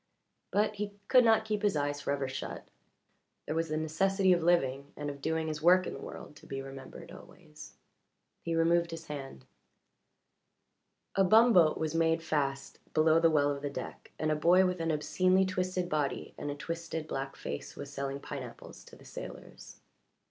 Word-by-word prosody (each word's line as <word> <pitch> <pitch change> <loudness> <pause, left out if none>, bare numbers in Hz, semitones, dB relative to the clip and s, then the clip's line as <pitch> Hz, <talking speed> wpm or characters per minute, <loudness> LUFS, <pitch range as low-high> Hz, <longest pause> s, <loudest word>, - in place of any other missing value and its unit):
But 210 0 +1
he 205 0 -3 0.2
could 255 -1 +7
not 225 -1 +4
keep 210 -1 -1
his 205 -5 +2
eyes 145 0 -1
forever 140 -1 -1
shut 130 +1 -6 0.8
there - - -3
was 165 0 -1
the 155 - -1
necessity 190 +5 +2
of 175 - +1
living 140 -5 +1
and 145 0 -3
of 140 0 -11
doing 160 +1 -1
his 155 -1 -4
work 180 +3 +5
in - - -4
the - - -8
world 150 - -9
to - - -16
be 135 - -4
remembered 135 0 -9
always. - - -13 0.7
He 165 -1 -2
removed 170 +1 +3
his 165 0 -7
hand. 135 - -8 1.7
A 195 - +3
bumboat 215 -5 +6
was 160 -1 -2
made 165 0 +2
fast 140 -4 -2 0.2
below 160 +1 +5
the 165 0 +5
well 145 -2 +3
of 140 -1 -4
the 145 - -2
deck, 140 - -7
and 155 0 0
a - - +2
boy 175 +5 +5
with 180 -1 -1
an 165 - -1
obscenely 185 +5 +2
twisted 185 -1 -1
body 150 -4 -2
and - - -5
a 145 - -3
twisted 165 0 -5
black 135 -1 -4
face - - -6
was 140 0 -8
selling 140 0 -3
pineapples 130 -4 -8
to - - -14
the - - -17
sailors. - - -10
160 Hz, 180 wpm, -31 LUFS, 145-180 Hz, 1.7 s, could